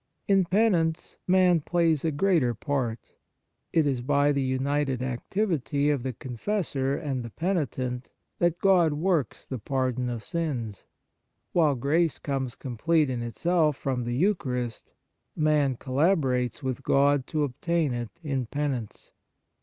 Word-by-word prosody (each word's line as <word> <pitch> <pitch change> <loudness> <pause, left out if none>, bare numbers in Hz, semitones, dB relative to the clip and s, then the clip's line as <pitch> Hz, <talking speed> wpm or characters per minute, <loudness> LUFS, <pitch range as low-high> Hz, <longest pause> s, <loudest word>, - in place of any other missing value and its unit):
In 195 -2 +4
Penance, 175 -4 +1
man 180 -2 +5
plays 165 -2 +1
a 165 - +2
greater 150 -6 +2
part; 125 -3 -3 0.6
it 160 -2 +3
is 135 -4 0
by 140 +3 +2
the 140 -1 0
united 135 0 0
activity 145 - 0
of 140 -4 0
the 130 +1 -2
con 125 +1 -8
fessor 140 - -1
and 140 -5 -3
the 115 - -7
penitent 130 - -2 0.3
that 175 -1 +2
God 180 -5 +4
works 155 - -1
the 130 - -5
pardon 130 +1 -1
of 115 -3 -4
sins. 130 - -3 0.7
While 155 -5 +3
grace 155 +6 +1
comes 135 -4 -3
complete 140 +4 0
in 120 -2 -3
itself 155 +5 +1
from 130 -3 -2
the 120 +1 -2
Eucharist, 125 - -1 0.4
man 150 -4 +2
collaborates 135 - +1
with 130 -2 -2
God 140 -1 +3
to 155 -2 0
obtain 150 +2 0
it 120 +6 -6
in 135 -5 -2
Penance. 135 -6 -4
140 Hz, 140 wpm, -27 LUFS, 125-165 Hz, 0.7 s, man